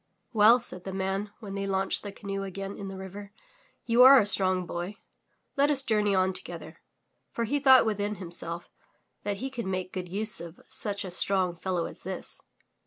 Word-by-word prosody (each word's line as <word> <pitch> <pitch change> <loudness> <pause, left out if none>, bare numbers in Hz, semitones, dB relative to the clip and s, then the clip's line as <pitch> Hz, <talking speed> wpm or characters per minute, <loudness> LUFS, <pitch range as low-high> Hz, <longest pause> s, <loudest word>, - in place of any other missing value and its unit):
"Well,'' 225 +3 +7
said 205 -6 -6
the 190 - -6
man 195 +2 -2
when 200 -3 -7
they 195 0 -3
launched 195 0 0
the 205 - -6
canoe 195 0 -5
again 195 +1 -5
in 200 - -7
the 195 0 -7
river, 195 +2 -8 0.5
'*you 235 +1 +4
are 265 +1 +10
a 210 - +2
strong 185 -2 +2
boy. 175 +4 -5 0.6
Let 285 +1 +3
us 275 -2 +3
journey 210 -4 +2
on 185 0 +2
together/' - - -7 0.5
For 235 - -3
he 280 +6 0
thought 265 -3 +7
within 210 -1 -1
himself 170 -2 -6 0.5
that 205 -1 -2
he 265 +5 -4
could 235 -6 -4
make 185 -1 -3
good 180 -2 -5
use 205 0 -1
of 170 0 -9
such 205 -1 -2
a 185 - -6
strong 185 -1 +2
fellow 175 0 -2
as - - -8
this. - - -5
195 Hz, 190 wpm, -28 LUFS, 185-215 Hz, 0.6 s, are